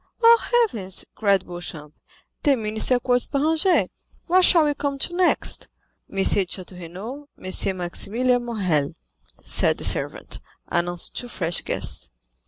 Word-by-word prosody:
"Oh, 460 Hz, 0 st, +6 dB, 0.2 s
heavens," 190 Hz, -, -2 dB
cried 200 Hz, -3 st, +2 dB
Beauchamp, 165 Hz, -4 st, -7 dB, 0.5 s
"the 280 Hz, -3 st, +3 dB
minister 220 Hz, +3 st, +2 dB
quotes 245 Hz, 0 st, +1 dB
Béranger, 320 Hz, +6 st, +2 dB, 0.4 s
what 370 Hz, +1 st, +4 dB
shall 335 Hz, -3 st, +6 dB
we 295 Hz, -1 st, +2 dB
come 280 Hz, -1 st, -3 dB
to 345 Hz, +5 st, -2 dB
next?" 365 Hz, 0 st, +1 dB, 0.4 s
"M. -, -, -13 dB
de 195 Hz, -, +2 dB
Château 185 Hz, -1 st, 0 dB
Renaud—M. 185 Hz, -, -5 dB
Maximilian 240 Hz, +8 st, 0 dB
Morrel," 185 Hz, -12 st, -1 dB, 0.5 s
said -, -, +2 dB
the -, -, -6 dB
servant, -, -, -1 dB, 0.3 s
announcing 175 Hz, 0 st, -1 dB
two 245 Hz, -, -5 dB
fresh 175 Hz, -7 st, -1 dB
guests. -, -, -1 dB
220 Hz, 130 wpm, -23 LUFS, 180-280 Hz, 0.5 s, Oh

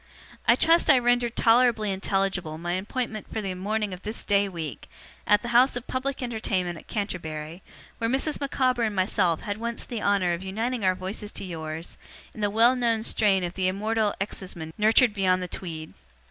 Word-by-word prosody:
'I -, -, +7 dB
trust 330 Hz, 0 st, +4 dB
I 275 Hz, -, +8 dB
rendered 245 Hz, -1 st, +2 dB
tolerably 230 Hz, -3 st, +3 dB
intelligible 190 Hz, -4 st, -1 dB
my 175 Hz, +2 st, -3 dB
appointment 215 Hz, +3 st, -4 dB
for 220 Hz, -, -2 dB
the 195 Hz, -3 st, -3 dB
morning 205 Hz, +2 st, -2 dB
of 180 Hz, -, -8 dB
this 215 Hz, +3 st, -5 dB
day 200 Hz, 0 st, +3 dB
week, 160 Hz, -, -7 dB, 0.4 s
at 210 Hz, -, +4 dB
the 235 Hz, -, -4 dB
house 245 Hz, +3 st, +4 dB
of 245 Hz, 0 st, -5 dB
public 265 Hz, +1 st, -3 dB
entertainment 190 Hz, -8 st, -2 dB
at -, -, -18 dB
Canterbury, 165 Hz, -5 st, -4 dB, 0.4 s
where 230 Hz, 0 st, 0 dB
Mrs. 275 Hz, +5 st, 0 dB
Micawber 255 Hz, -3 st, +1 dB
and 220 Hz, -3 st, 0 dB
myself 185 Hz, -3 st, +1 dB
had 205 Hz, 0 st, -4 dB
once 235 Hz, 0 st, -4 dB
the 235 Hz, -4 st, -5 dB
honour 195 Hz, -3 st, +2 dB
of 170 Hz, +2 st, -4 dB
uniting 225 Hz, +5 st, -2 dB
our 185 Hz, -1 st, +3 dB
voices 195 Hz, +3 st, -5 dB
to -, -, -5 dB
yours, 160 Hz, -1 st, -6 dB, 0.3 s
in 215 Hz, -, -8 dB
the 205 Hz, -, +2 dB
well 230 Hz, +4 st, +4 dB
known 230 Hz, -3 st, +1 dB
strain 200 Hz, -5 st, +2 dB
of 175 Hz, 0 st, -3 dB
the 185 Hz, -1 st, 0 dB
Immortal 215 Hz, +2 st, 0 dB
exciseman 180 Hz, -5 st, -5 dB
nurtured 220 Hz, +2 st, +4 dB
beyond 185 Hz, -2 st, +2 dB
the -, -, -4 dB
Tweed. 160 Hz, -3 st, -6 dB
205 Hz, 190 wpm, -26 LUFS, 185-235 Hz, 0.4 s, I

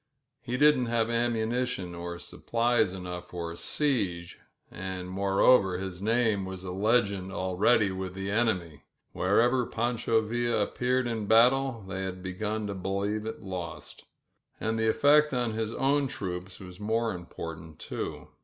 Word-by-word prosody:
He 125 Hz, +1 st, -3 dB
didn't 145 Hz, -3 st, +5 dB
have 115 Hz, 0 st, +1 dB
ammunition 115 Hz, -4 st, 0 dB
or 85 Hz, 0 st, -5 dB
s 85 Hz, -, -9 dB
plies 115 Hz, -3 st, +3 dB
enough 90 Hz, -1 st, -6 dB
for 85 Hz, -2 st, -5 dB
a -, -, -7 dB
siege, 95 Hz, -, -1 dB, 0.3 s
and, 90 Hz, 0 st, -5 dB
moreover, 95 Hz, +1 st, +3 dB
his 95 Hz, -1 st, -6 dB
name 110 Hz, -1 st, +2 dB
w« 95 Hz, -1 st, -6 dB
legend 100 Hz, -1 st, +1 dB
already 95 Hz, +3 st, +2 dB
with 95 Hz, -1 st, -5 dB
the 95 Hz, +1 st, -3 dB
enemy 90 Hz, -9 st, 0 dB, 0.2 s
— -, -, -49 dB
wherever 120 Hz, +7 st, +3 dB
Pancho 115 Hz, -1 st, +1 dB
'V 120 Hz, +2 st, -1 dB
appeared 125 Hz, +4 st, +1 dB
in 110 Hz, -3 st, -2 dB
battle, 120 Hz, 0 st, +4 dB
they 95 Hz, 0 st, -4 dB
had 95 Hz, -1 st, -5 dB
begun 105 Hz, +4 st, -3 dB
to 100 Hz, -, -3 dB
believe 100 Hz, +3 st, -2 dB
it 110 Hz, -, -6 dB
1 90 Hz, -4 st, -5 dB, 0.8 s
And 110 Hz, +1 st, -1 dB
the 110 Hz, 0 st, +2 dB
effect 145 Hz, +4 st, +4 dB
on 120 Hz, -2 st, 0 dB
his 110 Hz, 0 st, -2 dB
own 140 Hz, +1 st, +2 dB
troops 90 Hz, -6 st, -5 dB
was 90 Hz, -2 st, -11 dB
most 110 Hz, +1 st, 0 dB
imports 85 Hz, -2 st, -7 dB, 0.2 s
too. -, -, -6 dB
105 Hz, 150 wpm, -28 LUFS, 95-120 Hz, 0.8 s, didn't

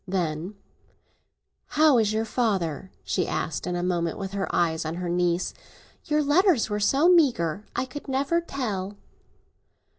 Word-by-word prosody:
Then, 180 Hz, 0 st, -2 dB, 1.2 s
"How 305 Hz, -5 st, +6 dB
is 215 Hz, -2 st, +2 dB
your 220 Hz, +1 st, 0 dB
father?" 195 Hz, -, -1 dB
she 180 Hz, -, -1 dB
asked 155 Hz, -, -3 dB
in 180 Hz, -, -1 dB
a 175 Hz, -, -2 dB
moment, 170 Hz, -2 st, -1 dB
with 195 Hz, -1 st, -5 dB
her 200 Hz, -1 st, -3 dB
eyes 165 Hz, -2 st, +1 dB
on 160 Hz, +1 st, -4 dB
her 175 Hz, 0 st, -4 dB
niece. 175 Hz, 0 st, 0 dB, 0.5 s
"Your 300 Hz, -2 st, +1 dB
letters 295 Hz, -, +3 dB
were 210 Hz, -, 0 dB
so 270 Hz, +10 st, +3 dB
meagre—I 240 Hz, -, +2 dB
could 275 Hz, +4 st, -9 dB
never 275 Hz, +6 st, +1 dB
tell!" 210 Hz, -, -4 dB
205 Hz, 145 wpm, -25 LUFS, 175-270 Hz, 1.2 s, How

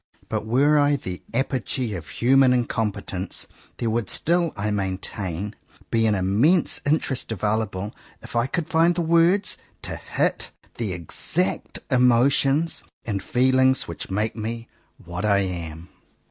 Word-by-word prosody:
But 110 Hz, -, -2 dB
were 145 Hz, +6 st, +4 dB
I 145 Hz, 0 st, +4 dB
the 90 Hz, -9 st, -6 dB
apogee 130 Hz, -2 st, -1 dB
of 85 Hz, -5 st, -7 dB
human 130 Hz, +1 st, +4 dB
incompetence, 105 Hz, -5 st, -2 dB, 0.3 s
there 115 Hz, -2 st, -1 dB
would 115 Hz, -3 st, -1 dB
still, 170 Hz, 0 st, +1 dB
I 105 Hz, +1 st, -1 dB
maintain, 95 Hz, 0 st, -3 dB, 0.4 s
be 115 Hz, -1 st, +3 dB
an 105 Hz, -, +2 dB
immense 110 Hz, -, +3 dB
interest 145 Hz, -5 st, 0 dB
available, 105 Hz, -1 st, -1 dB, 0.3 s
if -, -, -10 dB
I 115 Hz, +2 st, +2 dB
could 160 Hz, +3 st, -2 dB
find 170 Hz, +2 st, +3 dB
words 170 Hz, +4 st, +3 dB, 0.3 s
to -, -, -3 dB
hit -, -, -1 dB, 0.3 s
the 110 Hz, -5 st, -1 dB
exact 85 Hz, -3 st, -1 dB
emotions 135 Hz, +5 st, +3 dB, 0.2 s
and 100 Hz, -4 st, -2 dB
feelings 130 Hz, +4 st, +3 dB
which 85 Hz, -, -6 dB
make 105 Hz, +3 st, -1 dB
me 115 Hz, +1 st, -5 dB, 0.3 s
what 85 Hz, +1 st, -6 dB
I 100 Hz, -2 st, +4 dB
am. 85 Hz, -3 st, -5 dB
115 Hz, 130 wpm, -24 LUFS, 100-135 Hz, 0.4 s, were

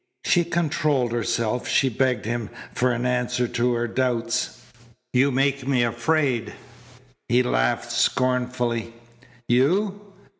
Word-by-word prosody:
She 175 Hz, -2 st, +3 dB
controlled 150 Hz, -6 st, 0 dB
herself. 115 Hz, +1 st, -1 dB
She 135 Hz, -, +3 dB
begged 125 Hz, -2 st, 0 dB
him 115 Hz, -1 st, -3 dB, 0.2 s
for 125 Hz, 0 st, +1 dB
an 120 Hz, +1 st, -2 dB
answer 125 Hz, 0 st, 0 dB
to 120 Hz, +1 st, +1 dB
her 120 Hz, 0 st, -1 dB
doubts. 120 Hz, -1 st, -1 dB, 0.5 s
"You 130 Hz, +2 st, +4 dB
make 135 Hz, 0 st, 0 dB
me 130 Hz, -3 st, +2 dB
afraid." 120 Hz, 0 st, 0 dB, 0.8 s
He 125 Hz, +1 st, +4 dB
laughed -, -, 0 dB
scornfully. 125 Hz, -2 st, 0 dB, 0.5 s
"You! 195 Hz, -, +1 dB
125 Hz, 115 wpm, -24 LUFS, 120-135 Hz, 0.8 s, You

